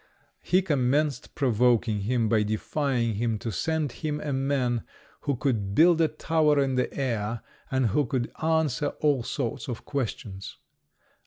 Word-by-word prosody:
He 185 +1 +2
commenced 145 -2 0
provoking 120 -3 +2
him 115 +3 0
by 110 0 +3
defying 115 +3 0
him 115 0 0
to 115 +2 -4
send 160 - -1
him 150 +1 -3
a 150 -2 -3
man 130 -3 0 0.5
who 140 - +2
could 110 -7 -1
build 165 +2 +6
a 160 - +5
tower 155 -1 +2
in 135 -1 +1
the 125 -1 0
air, 115 -4 -2 0.3
and 130 -1 +1
who 140 +7 +1
could 120 -1 -2
answer 160 -3 +1
all 145 -4 +3
sorts 120 0 -3
of 120 -3 -6
questions. 105 -7 -4
130 Hz, 150 wpm, -27 LUFS, 115-150 Hz, 0.5 s, build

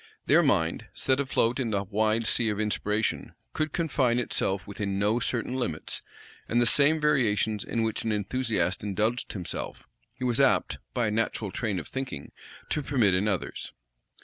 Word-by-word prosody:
Their - - +6
mind, 80 0 +1
set 130 0 +1
afloat 130 -3 +1
in 125 -3 0
the 100 -2 0
wide 110 +3 +1
sea 115 0 +2
of 105 0 -2
inspiration, 105 0 -1 0.2
could 155 -1 -1
confine 140 -8 +1
itself 95 -5 -1
within 100 -1 -3
no 105 +4 +2
certain 125 +1 -1
limits; 120 -12 -3 0.5
and 120 - +2
the 120 - +4
same 145 +6 +4
variations 110 -8 +2
in 115 - -1
which 110 -1 -1
an 115 - 0
enthusiast 105 -4 0
indulged 105 +4 -1
himself, 90 -4 -5 0.3
he - - -7
was 120 -1 +1
apt, 135 - +2 0.2
by 120 -2 +2
a 105 - 0
natural 110 -2 -1
train 110 -3 -2
of 85 - -5
thinking, 130 - -5 0.4
to 150 - 0
permit 125 -9 +2
in 95 +3 +2
others. 100 -4 -3
110 Hz, 170 wpm, -28 LUFS, 100-125 Hz, 0.5 s, Their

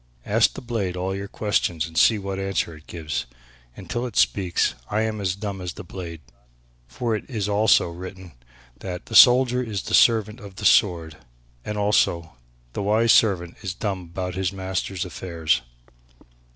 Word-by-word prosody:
Ask - - +3
the - - -7
blade 105 -7 -3
all 95 +1 -2
your 100 +1 -5
questions 95 -6 -1
and 80 -1 -11
see 110 +8 +5
what 95 -1 -4
answer 95 -4 -2
it 80 - -17
gives. 80 -6 -4 0.5
Until 120 +1 -4
it 115 - -10
speaks 90 -9 +2 0.2
I 110 - 0
am 110 -1 -2
as 95 -2 -1
dumb 100 -1 -5
as 90 -2 -5
the - - -9
blade, 85 -3 -8 0.7
for 120 -3 -2
it 105 - -4
is 110 -6 -2
also 105 -1 +4
written 95 +1 -9 0.5
that 90 -2 -6
'the 110 - -6
soldier 125 0 +7
is 110 -6 -4
the - - -6
servant 110 -1 +4
of 100 -4 -12
his 105 - +4
sword,' 85 -6 +2 0.5
and 105 - -4
also, 85 -7 +1 0.4
'the - - -3
wise 110 +3 +3
servant 90 -6 +3
is 95 -3 -4
dumb 95 -3 -3
about 90 +1 -4
his 95 0 -1
master's 95 -1 -3
affairs.'" 85 -2 -1
95 Hz, 170 wpm, -23 LUFS, 90-105 Hz, 0.7 s, soldier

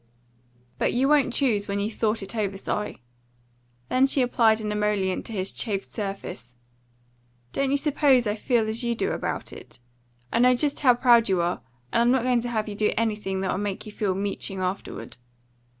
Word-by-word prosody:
"But - - +1
you 260 +3 +2
won't 285 -3 +3
choose 235 -6 +1
when 200 0 -2
you've 210 +2 -2
thought 220 -1 0
it 195 - -7
over, 200 -3 -1
Si." 210 -7 -4 0.8
Then 260 +1 +3
she 270 -1 +2
applied 230 -3 +3
an 210 -1 -3
emollient 210 -3 0
to - - -8
his 195 -3 0
chafed 200 -4 -2
surface. 195 - -6 1.0
"Don't 275 -1 0
you 280 - +2
suppose 280 -3 +3
I 210 - 0
feel 225 +1 0
as 220 +3 -2
you 235 0 0
do - - -1
about - - -4
it? - - -13 0.6
I - - +2
know 250 +1 +5
just 285 +3 0
how 250 -4 +5
proud 235 -3 +4
you 190 -2 +2
are, 170 -6 -1 0.3
and 235 - +4
I'm 240 - +4
not 260 -2 +2
going 250 -2 +2
to 240 - -4
have 220 -2 -1
you 210 - -4
do 210 +1 +1
anything 210 -4 -1
that 190 - -1
will 185 - -2
make 205 -2 -3
you 215 - -8
feel 205 -3 -1
meeching 195 0 -3
afterward. 185 +1 -4
220 Hz, 195 wpm, -25 LUFS, 200-245 Hz, 1.0 s, know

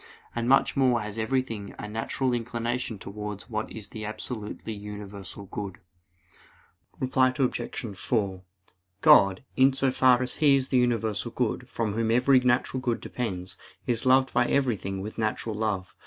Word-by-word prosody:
And 120 +1 -1
much 135 - +4
more 130 -4 +3
has 105 +1 -5
everything 115 -3 -2
a - - -6
natural 115 +4 -1
inclination 120 0 -2
towards 105 +3 -7
what 110 0 -3
is 105 -2 -7
the 110 - -7
absolutely 110 0 -5
universal 100 -1 -8
good. 100 -1 -6 1.2
Reply 130 0 +3
Obj. 120 -4 -2
4: 100 -4 -1 0.6
God, 95 +2 +6
in 135 +1 +5
so 135 0 +1
far 130 -1 +4
as 125 - -5
He 145 -3 +5
is 135 -1 0
the 130 - +3
universal 120 -2 +1
good, 125 +1 -2
from 115 -4 -2
Whom 115 +1 0
every 125 +3 +5
natural 125 +1 +1
good 120 -3 0
depends, 95 -7 -4 0.3
is 115 -2 0
loved 130 0 +4
by 120 0 +3
everything 105 -8 0
with 105 +3 -7
natural 110 0 -1
love. 105 -4 -2
115 Hz, 155 wpm, -27 LUFS, 105-125 Hz, 1.2 s, God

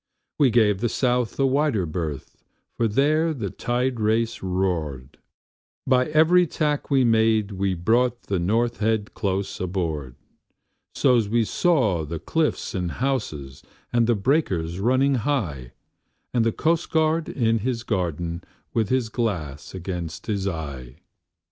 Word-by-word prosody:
We 140 -3 +5
gave 105 -4 +3
the 120 - +1
South 125 0 0
a 135 - +4
wider 135 - +1
berth, 80 -3 -5 0.4
for 115 - +1
there 155 +8 +2
the 105 -7 -4
tide 125 0 -1
race 110 +2 0
roared; 85 -8 -2 0.7
But 125 0 +3
every 170 +3 +4
tack 150 -2 -1
we 135 -2 +4
made 110 -2 +3
we 95 -1 -1
brought 120 +7 +1
the 95 -3 -1
North 115 +7 +1
Head 110 -1 0
close 95 0 -2
aboard: 80 -8 -3 0.8
So's 120 -6 +3
we 115 +1 +2
saw 110 - +1
the 80 +2 -5
cliffs 155 - -1
and 90 -4 -2
houses, 80 - -3 0.3
and 120 -1 +3
the 120 - +3
breakers 95 - 0
running 130 +6 +3
high, 85 - -2 0.6
And 120 -2 +3
the 115 - +2
coastguard 160 +1 +1
in 115 -2 +1
his 120 +1 -2
garden, 85 - -2 0.3
with 110 -3 0
his 130 -3 +1
glass 95 - -3
against 85 -3 -5
his 100 -3 -2
eye. 70 -8 -5
110 Hz, 135 wpm, -24 LUFS, 90-130 Hz, 0.8 s, We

